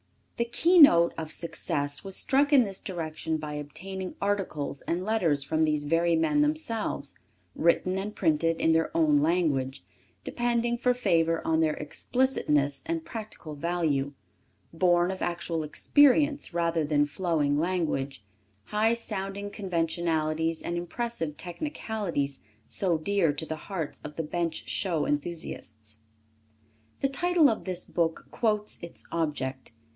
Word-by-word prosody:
The 235 - +1
keynote 280 - +6
of 160 -1 -5
success 145 -4 -2
was 195 -1 -4
struck 285 +2 +2
in 275 -4 +7
this 195 -3 -5
direction 160 -2 -3
by 150 -1 -6
obtaining 180 +6 -6
articles 195 -9 -2
and 175 +2 -2
letters 170 -10 +2
from 155 +3 +1
these 150 -1 +1
very 165 +2 +2
men 295 - +2
themselves, 295 -8 -1 0.4
written 185 +3 +2
and 210 +2 -5
printed 165 -1 +1
in 160 - +3
their 160 0 +2
own 150 -3 +4
language, 145 -5 0 0.4
depending 240 0 0
for 250 0 +2
favor 165 -8 +1
on 160 0 +2
their 155 -1 +2
explicitness 150 - 0
and 330 -1 -2
practical 215 -8 -7
value, 150 -3 -1 0.6
borne 175 +1 +3
of 190 - -6
actual 170 -1 -2
experience, 290 - +3
rather 170 -1 +1
than 145 -1 +2
flowing 150 -2 0
language, 155 - -1 0.4
high 220 - +2
sounding 200 -3 -3
conventionalities 165 -4 -1
and 170 - -3
impressive 175 -2 -3
technicalities 180 - -3 0.3
so 180 +2 +1
dear 180 -1 +2
to 145 +3 -4
the 160 - -4
hearts 170 -7 -4
of 150 0 -8
the 165 - -2
Bench 165 +1 -3
Show 170 -6 0
enthusiasts. 110 -9 -4 1.0
The 275 - +2
title 350 +2 +4
of 220 - -4
this 185 -2 -3
book 165 -2 -1
quotes 210 -2 0
its 170 - -9
object. 135 -7 -3
170 Hz, 135 wpm, -28 LUFS, 155-205 Hz, 1.0 s, in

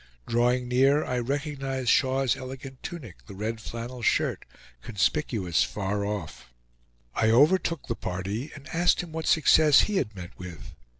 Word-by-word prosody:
Drawing 125 +1 +1
near, 135 +4 +3
I 125 -1 -1
recognized 135 -1 -2
Shaw's 130 -1 +3
elegant 130 0 -9
tunic, 130 - -8
the 100 - -10
red 110 +3 -4
flannel 120 +2 -7
shirt, - - +1 0.4
conspicuous 100 - 0
far 100 0 -2
off. 100 -11 -5 0.6
I 110 - +2
overtook 155 +6 +3
the 115 - -2
party, 100 +7 -4
and 145 0 -12
asked 175 +2 +2
him 170 - -10
what 160 0 -4
success 155 -2 +6
he 210 -2 0
had 110 - -2
met 90 -2 -8
with. 85 -2 -9
125 Hz, 145 wpm, -27 LUFS, 105-145 Hz, 0.6 s, success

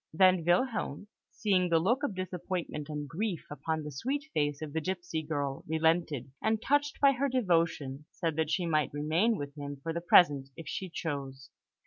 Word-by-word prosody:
Then 185 +1 +5
Wilhelm, 205 - 0 0.2
seeing 185 -4 +1
the 165 - +4
look 225 - +2
of 285 -10 -2
disappointment 180 -4 -4
and 150 -1 -4
grief 180 +2 -3
upon 155 +2 -2
the 150 - -6
sweet 280 - -3
face 145 -1 0
of 150 -2 -6
the 160 - 0
gipsy 175 -2 -3
girl, 145 -3 -3
relented, 160 -4 +1
and, 220 0 +1
touched 290 +4 +1
by 280 -1 +6
her 275 +1 0
devotion, 165 - 0
said 165 -5 -2
that 160 -1 +1
she 175 +2 0
might 155 -3 +1
remain 165 +10 +2
with 145 -3 -5
him 145 -1 -6
for 165 - -2
the 170 - -3
present, 145 -6 +5
if 165 -3 -9
she 190 +5 -4
chose. 140 -5 -5
165 Hz, 180 wpm, -31 LUFS, 150-190 Hz, 0.2 s, by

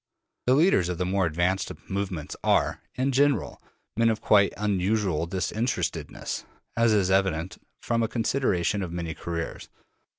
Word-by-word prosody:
The 130 - +5
leaders 145 - +4
of 90 - -2
the 90 - -1
more 95 0 +1
advanced 90 +4 0 0.2
movements 95 -5 -3
are, - - +2
in 130 +2 0
general, 140 +1 +1 0.3
men 115 +1 +3
of 110 -1 0
quite 100 -2 +4
unusual 100 -4 0
disinterestedness, 100 +7 -2 0.3
as 115 -1 +3
is 100 -3 +2
evident 95 -3 0 0.2
from 115 -1 +1
a 115 - +1
consideration 105 -6 0
of 90 -3 -4
their 85 -2 -3
careers. 85 0 -5
95 Hz, 140 wpm, -26 LUFS, 90-115 Hz, 0.3 s, The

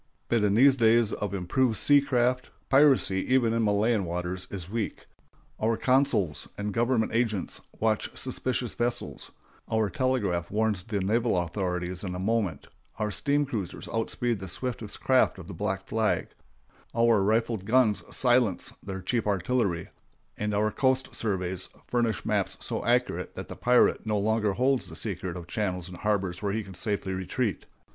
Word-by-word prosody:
But 115 -3 +2
in 100 -1 +3
these 135 +3 +6
days 115 -2 +4
of 105 - -3
improved 110 +6 +1
sea 145 -1 +5
craft, 125 -2 +1 0.2
piracy, 135 -9 +4
even 120 -3 +3
in 115 - +1
Malayan 105 +1 +2
waters, 90 +1 -4
is 90 -4 -6
weak. 110 +2 -4 0.5
Our 110 +1 +1
consuls 130 - +1
and 105 0 -3
government 120 -1 +1
agents 115 -5 -1 0.2
watch 110 -1 +1
suspicious 130 -2 -2
vessels; 120 0 -2 0.4
our 110 -2 +1
telegraph 110 - 0
warns 105 -2 0
the 100 0 -3
naval 110 +2 +1
authorities 90 0 -2
in 90 -2 -4
a - - -4
moment; 100 -6 -1 0.3
our 105 -1 -1
steam 145 +5 +2
cruisers 110 -10 -5
outspeed 115 0 -1
the 95 - -6
swiftest 115 +1 -5
craft 130 -5 +3
of 90 -3 -10
the - - -7
black 95 +3 -2
flag; 110 -1 0 0.7
our 115 -3 +4
rifled 110 0 +1
guns 115 -2 +3
silence 120 -6 +2
their 95 -1 -6
cheap 115 +3 0
artillery; 100 -3 0 0.5
and 105 0 -2
our 105 +1 +2
coast 130 +1 +1
surveys 95 -3 -2 0.2
furnish 115 -4 0
maps - - 0
so - - -3
accurate - - 0
that - - -7
the - - -6
pirate 125 0 +3
no 105 -1 +1
longer 105 0 +1
holds 130 -2 +1
the 80 - -10
secret 90 -2 -4
of 85 - -8
channels 90 -2 -2
and 90 - -9
harbors 100 -3 -1
where 100 -1 -1
he 110 0 -1
can 95 -1 -11
safely 100 -1 -2
retreat. 95 +4 -2
105 Hz, 160 wpm, -27 LUFS, 95-120 Hz, 0.7 s, these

